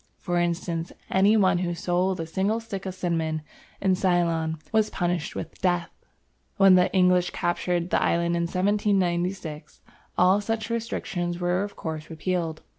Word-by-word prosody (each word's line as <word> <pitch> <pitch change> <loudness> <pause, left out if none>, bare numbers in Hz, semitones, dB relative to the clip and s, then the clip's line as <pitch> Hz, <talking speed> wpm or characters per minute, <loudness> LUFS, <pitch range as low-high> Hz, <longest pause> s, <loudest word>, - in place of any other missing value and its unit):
For 175 0 -1
instance, 170 -1 -2 0.2
any 200 +3 +4
one 185 -4 +3
who 175 -1 -1
sold 180 +2 0
a 165 - -2
single 195 +7 0
stick 195 -4 -6
of 185 - -5
cinnamon 165 -4 -1 0.4
in 190 -1 +2
Ceylon 170 -3 +1
was 220 -1 +2
punished 175 -2 -2
with 165 - -7
death. 175 -2 +1 0.7
When 195 -1 +7
the 180 0 +4
English 180 -1 +3
captured 175 0 -1
the - - +2
island 170 0 +1
in 170 - 0
1796, 180 -5 -1 0.4
all 185 +3 +4
such 220 +1 -3
restrictions 195 -7 -3
were 180 +1 +1
of 205 0 -6
course 160 -1 -5
repealed. 165 -1 -2
180 Hz, 150 wpm, -26 LUFS, 170-190 Hz, 0.7 s, When